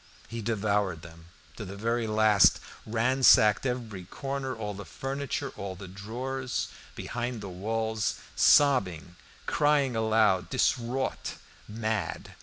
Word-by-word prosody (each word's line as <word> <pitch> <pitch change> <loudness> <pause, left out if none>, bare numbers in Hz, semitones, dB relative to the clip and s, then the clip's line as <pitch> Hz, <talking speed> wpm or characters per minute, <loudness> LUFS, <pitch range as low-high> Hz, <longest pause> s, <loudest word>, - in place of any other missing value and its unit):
He 115 0 -6
devoured 100 -5 0
them 85 -1 -13 0.3
to - - -5
the 95 - -7
very 115 +2 -1
last, 110 -2 +5 0.3
ransacked 120 -1 +4
every 115 -7 -4
corner, 135 +5 -4
all 105 -2 -4
the 100 +1 -8
furniture, 135 - -4
all 95 -1 -5
the 95 +1 -9
drawers, 125 +7 -4 0.3
behind 120 0 -4
the 100 -2 -7
walls, 110 +3 -2 0.2
sobbing, 90 - +4 0.3
crying 145 -4 +2
aloud, 110 -4 +2
distraught, 130 0 -1 0.3
mad. 110 -4 -3
110 Hz, 115 wpm, -28 LUFS, 100-125 Hz, 0.3 s, last